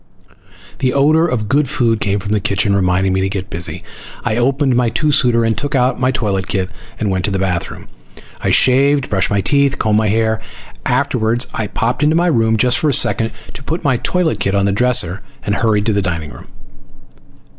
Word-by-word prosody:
The 130 0 0
odor 155 +4 +3
of 115 -9 -2
good 140 +3 +1
food 115 -3 +1
came 100 -1 0
from 100 +1 -5
the 105 - +2
kitchen, 100 0 0
reminding 95 0 +1
me 95 - 0
to 95 - 0
get 95 0 -5
busy. 85 -1 -2 0.4
I 110 - 0
opened 135 +2 +1
my 120 -1 +2
two 150 +6 0
suiter 120 -4 +3
and 115 -1 +1
took 145 0 -3
out 125 0 +1
my 130 0 +1
toilet 100 -7 -1
kit 95 -1 -2 0.3
and 105 -3 -1
went 95 -1 -1
to - - 0
the 100 - -1
bathroom. 95 -3 -3 0.6
I - - +1
shaved, 135 +1 +3
brushed 95 -2 +1
my 100 -1 +1
teeth, 140 +6 +2
and - - -9
combed 110 -1 +2
my 110 - 0
hair. 110 +1 0 0.5
Afterward 115 +3 +1
I 110 - -3
popped 120 +5 -2
into 150 +2 +3
my 170 +1 +2
room 115 -6 +2
just 125 +3 +2
for 155 - +1
a - - +1
second 115 -2 +2 0.2
to - - -9
put 165 +5 -4
my 135 -5 +2
toilet 180 +5 -1
kit 100 0 0
on 100 0 +2
the 100 - +1
dresser, 100 -5 +1 0.2
and 100 - -1
hurried 105 -1 +1
to 110 - +1
the 100 - +1
dining 85 -5 -3
room. - - -13
110 Hz, 215 wpm, -16 LUFS, 100-130 Hz, 0.6 s, odor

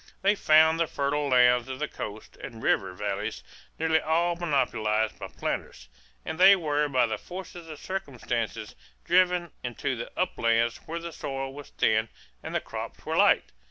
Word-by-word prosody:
They 200 +1 +5
found 160 -3 +5
the 165 - +2
fertile 145 +1 -1
lands 125 -1 +4
of 130 - -4
the 150 - -2
coast 105 -5 -8
and 115 -2 -9
river - - +1
valleys - - -3 0.3
nearly 160 0 +2
all 170 +3 +1
monopolized 120 -9 0
by - - -5
planters, 60 0 -5 0.4
and 160 - -5
they 195 +2 +9
were 150 -4 0
by 130 -3 +3
the 110 - -3
force 185 0 -8
of 165 -4 -9
circumstances 120 - -4 0.3
driven 180 -1 +3
into 130 +2 -2
the 120 - -6
uplands 115 -9 +1
where 165 - -4
the 170 0 -6
soil 135 -1 -4
was 145 0 -10
thin 110 0 +1 0.3
and - - -6
the - - +3
crops - - -7
were - - -2
light. - - +4
145 Hz, 165 wpm, -27 LUFS, 120-170 Hz, 0.4 s, they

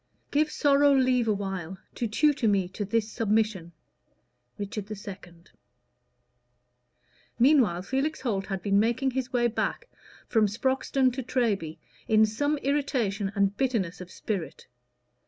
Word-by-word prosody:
"Give 300 +1 +2
sorrow 285 -1 +4
leave 255 -3 +2
awhile, 195 -4 -3 0.2
to 235 - -2
tutor 280 +2 +2
me 195 -3 +2
To 200 +3 -5
this 220 +1 -1
submission." 215 -5 0 0.9
Richard 205 0 -5
II. 200 -4 -8 2.0
Meanwhile 235 - +4
Felix 270 +8 -2
Holt 200 -7 -2
had 195 -3 -4
been 200 0 +3
making 240 +5 +1
his 260 0 -3
way 245 -1 +1
back 240 - -2 0.4
from 220 -2 +3
Sproxton 260 +3 0
to 265 - -3
Treby 210 -10 -1 0.3
in 220 0 +5
some 285 +8 -1
irritation 250 -9 0
and 200 0 +1
bitterness 210 -9 -1
of 180 - -9
spirit. 190 -6 -5
220 Hz, 125 wpm, -27 LUFS, 200-265 Hz, 2.0 s, in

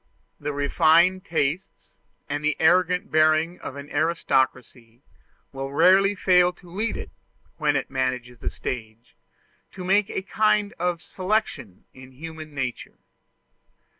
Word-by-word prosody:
The 145 +1 -3
refined 165 +6 +3
tastes 160 +3 -3 0.3
and 145 +1 -3
the 155 -1 0
arrogant 180 +4 +2
bearing 155 +2 +2
of - - -7
an 140 0 -8
aristocracy 130 -6 -1 0.5
will 135 0 -5
rarely 195 +7 +4
fail 180 -2 +4
to 175 -2 -17
lead 215 +5 -2
it, - - -8 0.5
when 150 -2 +1
it 135 - -2
manages 125 -2 -2
the - - -3
stage, 115 - -7 0.6
to 185 - -8
make 195 +2 +2
a - - -3
kind 210 0 +1
of 175 -1 -1
selection 185 - -3
in 130 0 -14
human 155 +1 -9
nature. 130 -3 -5
155 Hz, 130 wpm, -24 LUFS, 135-180 Hz, 0.6 s, rarely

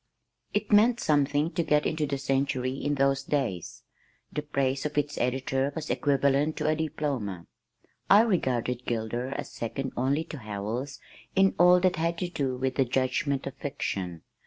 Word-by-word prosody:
It - - -2
meant 225 +3 +5
something 145 +1 +2
to 175 - 0
get 150 -2 +2
into 155 -2 0
the 140 - -1
Century 135 -1 0
in 145 +2 -1
those 135 0 +2
days. 135 - -2 0.5
The 150 - -1
praise 135 -2 -1
of 150 -1 -4
its 145 0 0
editor 130 +2 0
was 155 -1 -3
equivalent 140 +1 +2
to - - -1
a 155 - +3
diploma. 135 - -3 0.6
I 205 +2 +8
regarded 125 - 0
Gilder 120 +2 -2
as 135 - -5
second 130 +3 -4
only 135 +5 +1
to 155 -3 -8
Howells 110 +6 -4 0.4
in 195 0 +4
all 180 +1 +7
that 185 -1 +2
had 165 +1 0
to 180 0 -2
do 135 -6 -2
with 130 0 -2
the 135 - +4
judgment 135 +3 0
of 135 - -4
fiction. 95 - -4
140 Hz, 165 wpm, -28 LUFS, 130-155 Hz, 0.6 s, I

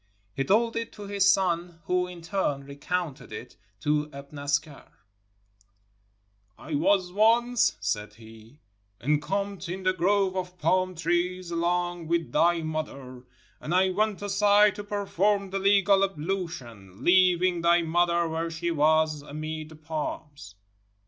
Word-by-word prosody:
He 135 - -1
told 230 +7 +2
it 230 0 -3
to 210 - -10
his 200 -1 +2
son, 175 -3 -1
who 180 +1 0
in 175 -2 -10
turn 165 -6 -1
recounted 140 -1 -4
it 105 - -8 0.3
to 150 +2 +1
Ibn 140 +1 -10
Askar: 145 +1 -3 0.8
— 100 0 -42
"I 155 - -5
was 180 +4 +2
once," 230 +4 +3
said 105 +1 -3
he, 110 +4 -16 0.4
"encamped 170 - -1
in 185 +1 -5
a 185 - +3
grove 190 +1 +1
of 180 -1 -4
pakn 185 0 +1
trees, 175 +1 -1
along 175 0 -1
with 170 0 -1
thy 170 -1 +2
mother, 140 -5 -5 0.4
and 170 - -3
I 185 0 +3
went 210 +1 -1
aside 205 0 +4
to 205 - -5
per 205 0 -3
form 200 +1 +1
the 195 - -1
legal 200 0 +4
ablution, 155 - -5
leaving 180 -1 +4
thy 170 0 +4
mother 170 +1 +2
where 165 +1 -2
she 170 +1 -3
was, 155 -1 +2
amid 155 +1 -6
the 160 - -12
palms. 150 -7 -6
170 Hz, 140 wpm, -27 LUFS, 150-190 Hz, 0.8 s, aside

